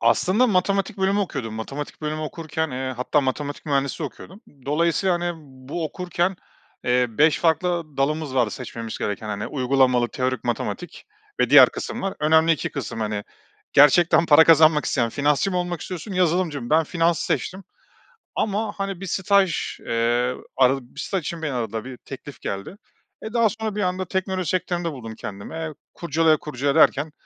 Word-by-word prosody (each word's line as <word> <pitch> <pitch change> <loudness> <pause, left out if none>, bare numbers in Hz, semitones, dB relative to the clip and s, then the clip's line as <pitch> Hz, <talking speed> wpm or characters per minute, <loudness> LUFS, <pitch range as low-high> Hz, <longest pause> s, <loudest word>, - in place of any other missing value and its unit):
Aslında 185 - +3
matematik 195 0 0
bölümü 195 +1 +2
okuyordum. 135 - -3
Matematik 135 +6 -6
bölümü 155 0 -3
okurken, 160 0 -3
eee, 130 0 -3
hatta 130 +4 +1
matematik 145 +3 -3
mühendisliği 140 +2 0
okuyordum. 190 +8 -12 0.3
Dolayısıyla 170 +5 +2
hani 175 0 -1 0.4
bu 165 +3 -3
okurken, 180 +3 -2 0.5
eee, 125 0 +3
5 150 +7 +3
farklı 165 -2 0
dalımız 145 0 -1
vardı 120 -4 +2
seçmemiz 115 -2 -6
gereken. 105 +1 -3
Hani 105 0 -3
uygulamalı 130 -3 +2
teorik 130 0 -2
matematik 120 - -4 0.3
ve - - +2
diğer - - +9
kısım - - -5
var. 195 0 -2
Önemli 160 +2 +4
2 155 - -2
kısım. 115 - -5
Hani, 105 -1 -2 0.5
gerçekten 165 +4 +6
para 160 +1 +7
kazanmak 155 -2 +6
isteyen 120 - +1
finansçı 145 +6 +1
mı 180 - -2
olmak 175 -2 -2
istiyorsun, 185 +3 -6
yazılımcı 175 -5 +1
mı? 120 - -7
Ben 160 +1 +4
finansı 165 0 +1
seçtim 190 +1 -2 0.7
ama 210 +1 -1
hani 195 -2 -4
bir - - -4
staj, 190 -1 +1
eee, 120 +2 +1 0.2
aradı 135 +1 +4 0.2
bir - - -8
staj 195 - -1
için 170 +1 -4
beni 150 -3 -2
aradılar. 115 -2 -3
Bir 130 -1 -8
teklif 135 +2 -10
geldi. 100 - -5 0.4
E, 220 - -7
daha 230 -2 +4
sonra 220 -1 -4
bir 210 - -1
anda 185 0 -1
teknoloji 185 -1 -2
sektöründe 175 -2 -1
buldum 115 -6 -8
kendimi. 100 +2 -8
Eee, 160 -1 -4 0.2
kurcala 160 -1 +2
kurcala 140 -1 -2
derken 145 +3 +4
155 Hz, 165 wpm, -23 LUFS, 130-180 Hz, 0.7 s, diğer